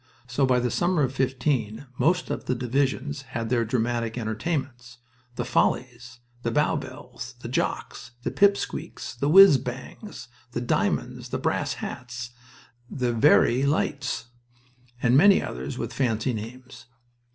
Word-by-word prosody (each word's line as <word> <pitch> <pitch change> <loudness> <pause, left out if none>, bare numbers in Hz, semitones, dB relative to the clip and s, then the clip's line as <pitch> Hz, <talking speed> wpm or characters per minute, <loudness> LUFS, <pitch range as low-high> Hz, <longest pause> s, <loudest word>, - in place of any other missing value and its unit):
So 125 +2 +1
by 125 -1 +3
the 125 -1 -1
summer 175 -3 +1
of 130 -1 -1
'15 130 -3 -1
most 180 +2 +2
of - - -4
the 130 - 0
divisions 135 +3 -1 0.2
had 115 0 -3
their 120 -2 +3
dramatic 115 0 -1
entertainments: 125 +2 -3 0.4
"The 120 - -3
Follies," 125 -1 0 0.2
"The 120 - -1
Bow 150 +6 +2
Bells," 125 +2 -8
"The - - -6
Jocks," 120 -1 -3
"The - - -1
Pip 200 0 +4
Squeaks," - - -6
"The 140 - -1
Whizz 190 -4 +9
Bangs," 130 - -8 0.3
"The 120 - -2
Diamonds," 120 - -1
"The - - -2
Brass - - -1
Hats," 125 -1 -6 0.6
"The 125 -3 -1
Verey 120 +2 +4
Lights," 140 -2 -1 0.8
and 125 0 +4
many 195 +7 +7
others 65 +3 -5
with - - -4
fancy 120 -1 0
names. 120 +3 -8
125 Hz, 140 wpm, -25 LUFS, 120-140 Hz, 0.8 s, Whizz